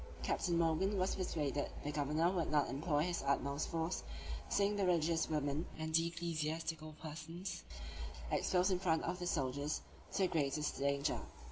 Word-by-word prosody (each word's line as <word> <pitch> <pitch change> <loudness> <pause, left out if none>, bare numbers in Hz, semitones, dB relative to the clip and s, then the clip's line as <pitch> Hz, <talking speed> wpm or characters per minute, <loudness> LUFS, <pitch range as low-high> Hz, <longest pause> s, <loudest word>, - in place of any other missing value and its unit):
Captain 175 -3 +1
Morgan 170 +5 +2
was 185 +1 +2
persuaded 145 -6 -1
the 145 - -1
governor 150 +4 +2
would 175 -4 0
not 150 -1 +3
employ 145 +1 +1
his 175 0 0
utmost 140 +1 +1
force, 165 +2 -1
on - - -9
seeing 200 +1 +3
the 200 - +1
religious 165 -1 +3
women 150 +1 0
and 160 0 -1
ecclesiastical 165 -1 -1
persons 165 +4 -5 0.7
exposed 185 +1 +3
in 185 - +3
the - - -11
front 160 -3 +3
of 180 - -1
the 175 - -2
soldiers 140 -2 0 0.3
to 195 - +2
the - - +5
greatest 150 -2 0
danger. 140 +1 +1
160 Hz, 160 wpm, -37 LUFS, 150-175 Hz, 0.7 s, the